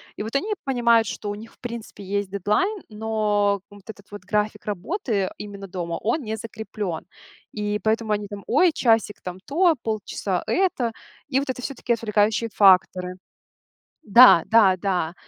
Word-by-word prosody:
И - - -5
вот 225 +5 -7
они 420 +10 0
понимают, 235 -3 +3
что 205 - -5
у 205 - -3
них, 225 +2 -11
в - - -29
принципе, 235 -4 -8
есть 200 0 -3
дедлайн, 210 - 0
но 210 -2 0
вот 205 -1 -15
этот 200 -2 -11
вот 205 -2 -9
график 210 +2 -1
работы 210 - -2
именно 200 -1 -8
дома, 175 -2 -4
он 245 +6 0
не 220 0 -4
закреплен. 215 -6 -6 0.5
И 210 0 -2
поэтому 220 0 +1
они 210 0 -2
там: 205 -1 -8
"Ой, 360 -2 +4
часик 225 -6 +1
там 180 0 -7
то, 340 +3 +3
полчаса 210 -3 -2
это". 350 -11 +1 0.4
И 260 - 0
вот 275 -1 -2
это 250 - -7
всё-таки 245 -2 -2
отвлекающие 220 0 +1
факторы 185 -2 +4 0.9
да, 220 -5 +8
да, 205 -5 +5
да. 180 -3 -1
210 Hz, 160 wpm, -23 LUFS, 200-230 Hz, 0.9 s, да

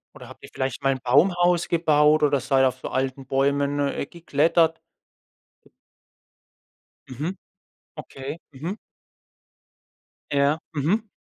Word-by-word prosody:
Oder - - -12
habt - - -15
ihr - - -10
vielleicht 130 +1 -3
mal 135 -1 +2
Baumhaus 175 +7 +2
gebaut 155 -2 +3
oder 140 -2 +3
seid 135 +1 +2
auf 130 0 -1
so - - -6
alten 130 0 -2
Bäumen, 140 +1 0
äh, 140 0 -1
geklettert? 165 0 +1 2.3
Mhm. 150 +9 -4 0.6
Okay. 145 0 -7
Mhm. 165 +10 -6 1.5
Ja. 140 +2 +2
Mhm. 195 +10 0
145 Hz, 105 wpm, -24 LUFS, 135-165 Hz, 2.3 s, gebaut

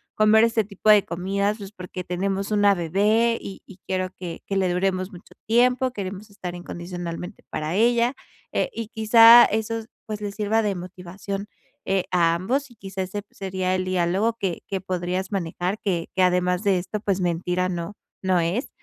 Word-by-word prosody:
comer 215 +1 +5
este 230 -1 +2
tipo 200 +1 -2
de 210 -2 +7
comidas, 200 +4 -1
pues, 200 -2 -9
porque 180 -2 -7
tenemos 195 +3 -2
una 205 -1 +4
bebé 210 +7 +2
y 195 - -9
y 195 - -14
quiero 185 0 -1
que 175 -2 -7
que 195 - -1
le 190 -1 +2
duremos 185 +1 -1
mucho 180 0 -14
tiempo, 250 +3 +3
queremos 200 -1 -6
estar 180 -3 -6
incondicionalmente 175 +1 -7
para 155 +3 -3
ella", 235 +4 +3 0.4
eh, - - 0
y 225 -2 -5
quizá, 230 +1 +8
esos, 220 +1 -2 0.2
pues, 215 -1 -4
le 205 -1 -3
sirva 215 +2 +1
de 205 -2 0
motivación, 185 +3 -6 0.4
eh, 190 -1 +1
a 170 -2 +3
ambos 255 +11 -1
y, - - -17
quizás, 190 -2 -5
se 205 +1 -5
sería 185 -1 -2
el 185 0 -1
diálogo 185 +5 +1
que 185 -4 -2
que 190 -2 -3
podrías 185 +1 -3
manejar, 180 +2 -2
que 175 -5 -1
que 190 - +2
además 180 +1 +2
de 200 -3 +3
esto, 200 +4 -4
pues, 200 -2 -1
mentira 180 +1 0
no 175 +2 -4 0.3
no 185 -1 +2
es. 175 - -1
195 Hz, 180 wpm, -24 LUFS, 180-215 Hz, 0.4 s, quizá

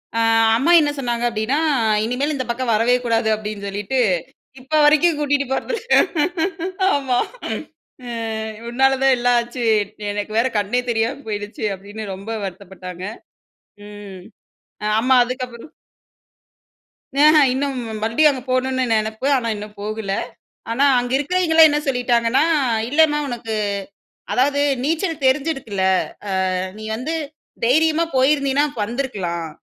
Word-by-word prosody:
அ - - +1 0.4
அம்மா 285 +8 +2
என்ன 295 -2 +2
சொன்னாங்க 240 -3 -2
அப்படீன்னா, 230 +5 -1 0.5
"இனிமேல் 255 +7 -1
இந்த 260 -2 -3
பக்கம் 235 0 -1
வரவே 230 +3 +3
கூடாது." 225 -1 +1
அப்படீன்னு 210 -1 -6
சொல்லிட்டு, 205 +6 -3 0.6
இப்ப 265 +4 -11
வரைக்கும் 310 +2 +4
கூட்டிட்டு 285 -1 +1
போறதில்ல. 455 - -2 1.1
ஆமா. 265 -3 0 0.9
"அ - - -8 0.6
உன்னால 265 +2 +2
தான் 270 -1 +5
எல்லாம் 245 0 +2
ஆச்சு. 240 +1 -5 0.5
எனக்கு 205 +1 -4
வேற 240 - +2
கண்ணே 210 +5 0
தெரியாம 235 +4 -1
போயிடுச்சு." 205 0 -4
அப்படீன்னு 205 +3 -9
ரொம்ப 195 +4 -8
வருத்தப்பட்டாங்க. 185 -1 -8 0.8
ம். 205 -3 -10 0.8
அம்மா 260 +2 +3
அதுக்கப்புறம் 250 +1 -7 1.4
அஹ்ம் 300 -1 +6
இன்னும் 270 +1 -2 0.2
மறுபடியும் 230 +8 +4
அங்க 260 -2 -5
போகணும்னு 260 0 0
நெனைப்பு. 220 +3 -1
ஆனா, 240 -3 -1
இன்னும் 210 0 -9
போகல. 215 -1 -4 0.6
ஆனா, 250 +5 +2
அங்க 245 0 -2
இருக்கிறவைங்கலாம் 320 +2 +4
என்ன 295 - +1
சொல்லிட்டாங்கன்னா, 245 0 +2 0.4
"இல்லன்னா 295 +2 +3
உனக்கு 235 -3 -4 0.8
அதாவது 280 +3 +2 0.2
நீச்சல் 325 +2 -1
தெரிஞ்சிருக்குல்ல? 260 -8 0 0.8
அ - - -8
நீ 215 - -9
வந்து 255 +8 -4 0.5
தைரியமா 315 +6 +3
போயிருந்தீன்னா 275 +1 +3
அப்ப 280 -5 -9
வந்துருக்கலாம். 200 -9 -3
250 Hz, 120 wpm, -20 LUFS, 220-280 Hz, 1.4 s, அஹ்ம்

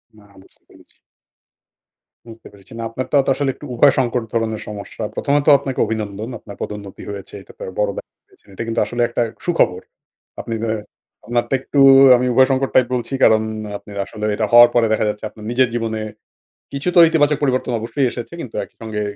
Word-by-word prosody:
না, 105 - -19 0.2
বুঝতে - - -20
পেরেছি। - - -22 1.3
বুঝতে 115 -1 -13
পেরেছি। 100 +1 -15
না - - -4
আপনারটা 130 +4 -2
তো - - -1
আসলে 140 -2 -1
একটু 150 - -12
উভয় 140 +4 +5
সংকট 120 -2 0
ধরনের 110 -1 -1
সমস্যা। 105 +1 -7
১ম 140 - -1
ত - - -16
আপনাকে 135 -2 -5
অভিনন্দন। 110 0 -4
আপনার 100 - -11
পদোন্নতি 100 -2 -7
হয়েছে 100 -1 -9
এটা - - -16
তো - - -7 0.2
বড় 105 -1 +2
ব্যা - - -6 0.5
এটা 115 - -5
কিন্তু 115 - -1
আসলে 120 +3 -3
একটা 120 - -2 0.2
সুখবর। 95 - +1 0.6
আপনি 115 - -6
যে 110 - -1 0.5
আপনারটা 120 +2 -1
একটু 140 - -2 0.4
আমি 125 - -1
উভয় 130 +1 +5
সংকট 135 0 0
টাইপ 125 -2 +5
বলছি 120 +2 -3
কারণ 110 -1 +5 0.4
আপনার 100 0 -12
আসলে 105 -1 -6
এটা 110 - 0
হওয়ার 120 0 +8
পরে 115 -2 +4
দেখা 110 - +1
যাচ্ছে 105 +1 -6
আপনার 110 - -14
নিজের 125 0 +2
জীবনে 110 -2 -2 0.7
কিছু 140 +5 -3
তো - - +9
ইতিবাচক 150 -2 +2
পরিবর্তন 130 -2 0
অবশ্যই 120 +4 -1
এসেছে 120 +6 -8
কিন্তু 120 - -8
একইসঙ্গে 110 -2 -6
115 Hz, 180 wpm, -19 LUFS, 110-130 Hz, 1.3 s, তো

